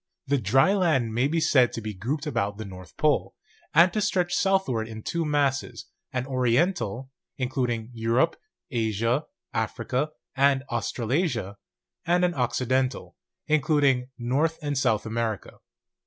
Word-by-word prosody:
The 140 0 +1
dry 135 - +4
land 155 - +2
may 120 +4 +2
be 165 +3 0
said 130 -6 +4
to - - -3
be 110 -1 -5
grouped 125 - -3
about 100 -9 -1
the 110 - -6
North 95 -3 -11
Pole, - - +1 0.4
and 170 +3 +5
to 215 - 0
stretch 180 -3 +1
southward 190 - +1
in 110 -1 -8
two 170 -1 -1
masses, 135 -5 0 0.3
an 125 -2 -2
Oriental, 130 - 0 0.3
including 125 -3 -2
Europe, 115 +8 +1 0.4
Asia, 115 +3 0 0.3
Africa, 130 +4 -1 0.3
and 135 -1 +3
Australasia, 120 - -1 0.5
and 175 +1 +3
an 175 - 0
Occiden 130 0 +1
tal, - - -11 0.3
including 145 -4 +2
North 140 +7 0
and 145 -1 -1
South 115 -5 +1
America. 115 -2 -3
130 Hz, 140 wpm, -26 LUFS, 115-150 Hz, 0.5 s, and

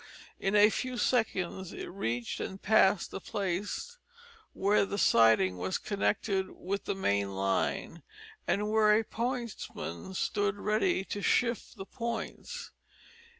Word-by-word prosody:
In 195 +2 0
a 210 +1 +7
few 255 +3 -3
seconds 190 -7 0
it - - -6
reached 120 -11 -3
and 190 - -5
passed 200 -3 +3
the - - -6
place 205 - -3 0.5
where 200 +2 +2
the 200 0 -3
siding 110 - +4
was 95 +1 -1
connected 200 -1 0
with 200 +2 -4
the - - -1
main 100 - 0
line, 95 0 -1 0.5
and 210 +1 +1
where 215 -1 +5
a - - -1
pointsman 230 - -4
stood 205 +1 0
ready 215 - +1
to 205 - -4
shift 235 +3 +1
the 195 - -6
points. 235 - -5
200 Hz, 130 wpm, -30 LUFS, 185-220 Hz, 0.5 s, a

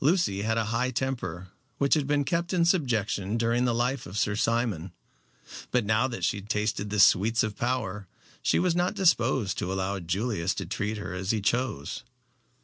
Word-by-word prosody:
Lucy 155 - +2
had 110 +2 0
a 115 - +1
high 125 +2 +1
temper, 120 -9 -3 0.3
which 140 0 +2
had 150 -3 +2
been 145 0 +2
kept 170 +4 -1
in 170 -2 +3
subjection 115 - +1
during 120 +2 +1
the 120 - +2
life 125 0 -1
of 90 +4 -7
Sir 105 0 +1
Simon. 110 -7 0 0.8
But 125 -3 +1
now 110 +4 +2
that 120 -8 -6
she 100 +3 0
tasted 105 0 -2
the 105 0 -1
sweets 110 +4 +5
of 110 -2 -3
power 105 -6 -2 0.3
she - - +2
was 175 -1 +2
not 180 +4 +1
disposed 130 - +2
to 90 - -2
allow 95 +1 -2
Julius 95 +2 -1
to - - -4
treat 105 +2 -3
her 105 - -5
as 95 +1 -4
he 110 - +2
chose. 110 - -1
115 Hz, 185 wpm, -27 LUFS, 100-130 Hz, 0.8 s, sweets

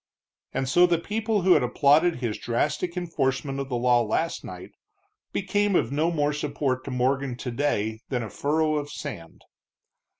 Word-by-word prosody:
And 135 - -2
so 175 +7 +5
the 175 -1 +2
people 215 +3 -1
who 185 0 +6
had 150 - +4
applauded 145 +7 +3
his 120 -4 -3
drastic 150 +9 -1
enforcement 140 -5 -1
of 135 -1 -4
the 125 - -1
law 120 0 +3
last 140 +9 -1
night, - - -9 0.6
became 205 0 0
of 125 -7 +1
no 155 +4 +1
more 150 -3 0
support 140 -3 -2
to - - -5
Morgan 130 0 0
today 120 -4 -1
than 125 -3 -1
a 110 - -6
furrow 155 +1 +1
of 145 0 -4
sand. 105 - -8
145 Hz, 165 wpm, -26 LUFS, 125-165 Hz, 0.6 s, who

